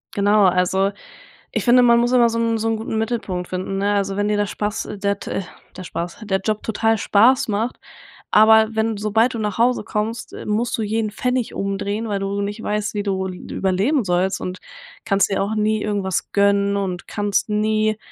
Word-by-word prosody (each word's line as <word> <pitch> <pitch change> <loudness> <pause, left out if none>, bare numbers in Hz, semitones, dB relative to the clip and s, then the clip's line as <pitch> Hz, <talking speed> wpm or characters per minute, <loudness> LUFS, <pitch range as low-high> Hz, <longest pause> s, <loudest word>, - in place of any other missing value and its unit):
genau, 205 0 +4
also, 185 +2 +2 0.6
ich - - -1
finde, 250 +1 +5
man 235 -1 +5
muss 240 +1 +1
immer 245 -2 +5
so 230 0 -2
'n 230 0 +1
so 225 +1 -2
'n 225 - +1
guten 220 0 -4
Mittelpunkt 220 -6 -2
finden, 185 +1 -4
ne? 200 +1 +1
Also, 195 -1 -1
wenn 205 0 +1
dir 210 - +1
der 205 0 +1
Spaß 210 +2 -3
der 200 0 -1
t - - -7
äh, - - -1 0.4
der 185 - -7
Spaß 175 +2 -6
der 190 -2 0
Job 215 -1 -1
total 225 0 +1
Spaß 230 +6 +3
macht, 220 +3 -2 0.5
aber 220 0 +6
wenn 220 0 0
sobald 220 +4 +1
du - - -3
nach 210 -1 -3
Hause 245 +2 +2
kommst, 215 +2 -3
äh, - - -8
musst 225 +4 -1
du - - -1
jeden 215 0 -1
Pfennig 250 +2 -2
umdrehen, 200 +3 -2
weil 200 -2 -2
du 195 +1 -2
nicht 205 +2 -4
weißt, 210 +1 -2
wie 205 - -1
du 190 -2 -2
l 185 - -5 0.2
überleben 200 +9 +1
sollst, 185 +1 0
und 185 0 -5 0.5
kannst 195 -2 +2
dir 195 -1 0
auch 215 +2 -2
nie 215 0 +1
irgendwas 200 -3 -2
gönnen 200 0 +2
und 185 -3 -3
kannst 205 0 -1
nie, 215 0 +1
210 Hz, 205 wpm, -21 LUFS, 195-225 Hz, 0.6 s, aber